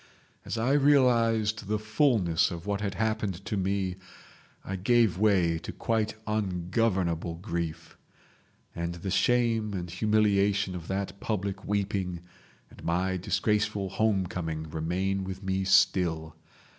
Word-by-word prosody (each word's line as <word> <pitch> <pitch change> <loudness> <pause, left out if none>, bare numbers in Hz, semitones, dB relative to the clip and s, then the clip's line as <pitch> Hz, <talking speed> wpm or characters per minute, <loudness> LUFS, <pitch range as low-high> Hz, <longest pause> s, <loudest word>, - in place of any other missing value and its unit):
As - - -3
I 115 +4 +1
realised 115 -7 +3
the 105 +1 +1
fulness 110 - +2
of 85 0 -7
what 100 0 -1
had 100 -2 -2
happened 105 -3 -2
to - - -2
me, 95 -1 -1 0.7
I 95 - -3
gave 105 -1 +2
way 90 -6 +3
to - - -7
quite 110 -2 -1
ungovernable 90 -4 0
grief. 85 -3 -5 0.8
And 85 0 -3
the 90 +3 -5
shame 115 -1 +2
and 90 -2 -4
humiliation 100 -1 +2
of 85 -2 -7
that 100 0 -3
public 100 -2 -3
weeping 100 -4 -1 0.5
and - - -14
my 90 +3 0
disgraceful 100 +1 0
homecoming 90 -6 -1
remain 95 +5 -1
with 95 +1 -6
me 95 0 -1
still. 90 -5 +2
95 Hz, 125 wpm, -28 LUFS, 90-110 Hz, 0.8 s, realised